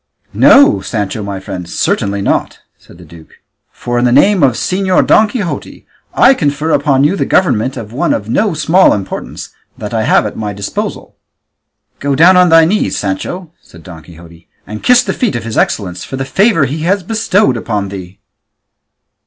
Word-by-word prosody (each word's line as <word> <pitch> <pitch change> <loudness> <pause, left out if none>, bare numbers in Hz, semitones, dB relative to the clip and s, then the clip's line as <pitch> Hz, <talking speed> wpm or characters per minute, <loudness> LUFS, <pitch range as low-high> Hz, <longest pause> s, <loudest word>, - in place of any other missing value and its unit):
"No, 285 +1 +5
Sancho 105 -1 -4
my 100 -1 -5
friend, 95 -3 -8
certainly 100 0 -2
not," - - -1 0.2
said - - -19
the 90 - -15
duke, 80 0 -16 0.4
"for 120 0 -3
in 120 - +1
the 120 - +2
name 185 +9 +3
of 135 -3 +3
Señor 185 +7 0
Don 215 - +4
Quixote 210 -5 -6 0.3
I 265 - +5
confer 150 - -2
upon 140 -2 +1
you 150 +7 +2
the - - -1
government 130 - 0
of 110 0 -8
one 130 - -1
of 105 - -2
no 195 - 0
small 160 +5 +3
importance 100 -2 -7 0.3
that - - -7
I - - 0
have - - +2
at - - -5
my 105 -2 -5
disposal." 100 0 -6 0.8
"Go 140 0 -1
down 175 +6 +5
on 180 -1 +4
thy 165 0 +6
knees, 205 +6 -1
Sancho," 155 - -5
said 85 -1 -17
Don 85 -2 -11
Quixote, 85 +1 -16 0.2
"and 105 0 -8
kiss 250 0 +4
the - - -3
feet 240 - -2
of 120 - -4
his 115 -1 -6
excellence 90 -4 -2
for - - -7
the 135 - -3
favour 190 - +2
he 140 +4 -4
has 185 +5 -1
bestowed 210 - 0
upon 105 -4 -3
thee." 95 -1 -9
135 Hz, 185 wpm, -13 LUFS, -, 0.8 s, thy